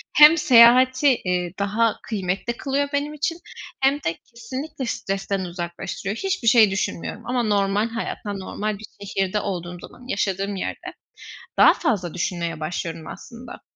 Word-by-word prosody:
hem 300 +3 +9
seyahati, 255 0 +6 0.2
eee, 180 -1 -1
daha 215 +3 +1
kıymetli 205 +3 -3
kılıyor 280 +1 -1
benim 290 +1 -1
için 315 +3 -2 0.5
hem 270 +1 +4
de 220 - -2 0.2
kesinlikle 260 +4 -6
stresten 195 -3 -2
uzaklaştırıyor. 175 +3 -5
Hiçbir 385 -8 -2
şey 220 -3 +6
düşünmüyorum. 195 -3 -3
Ama 245 0 0
normal 205 0 +1
hayatta, 225 -2 -4
normal 200 +2 -4
bir 215 - -10 0.2
şehirde 195 +1 -1
olduğum 180 -3 -4
zaman, 250 - -13
yaşadığım 195 -3 -1
yerde 190 - -5 0.7
daha - - +8
fazla 185 -7 -1
düşünmeye 170 -2 -3
başlıyorum 165 0 -4
aslında. 240 +1 -10
210 Hz, 135 wpm, -23 LUFS, 185-255 Hz, 0.7 s, hem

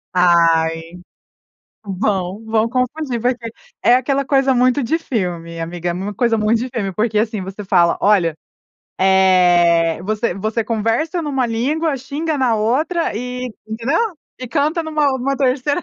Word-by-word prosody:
Ai. 165 -1 +2 0.9
Vão, 195 0 -2
vão 220 0 +1
confundir, 255 +1 -2
porque 245 -1 -1 0.3
é 240 - +5
aquela 275 +2 +1
coisa 270 -1 +2
muito 255 +2 +2
de 315 +8 0
filme, 175 - -4
amiga, 175 +1 -3
é - - -1
uma 195 +4 -4
coisa 230 +2 +1
muito 215 +2 +2
de 250 +3 -3
filme, 200 -5 -3
porque 215 +3 -1
assim, 215 -1 0
você 190 +2 -7
fala 175 -3 +3
olha, 185 -6 +3 0.6
eh, 180 -3 +4
você 215 0 -1
você 215 +3 -2
conversa 230 - -1
numa 270 -4 -1
língua, 280 +7 -1
xinga 290 +4 -3
na 250 -4 +2
outra 270 - 0
e 250 +1 -4 0.2
entendeu? 230 +8 -1 0.4
E 255 - -5
canta 305 +4 0
numa 310 -2 0
numa 275 +2 -1
terceira. 280 +4 0
225 Hz, 150 wpm, -18 LUFS, 190-265 Hz, 0.9 s, é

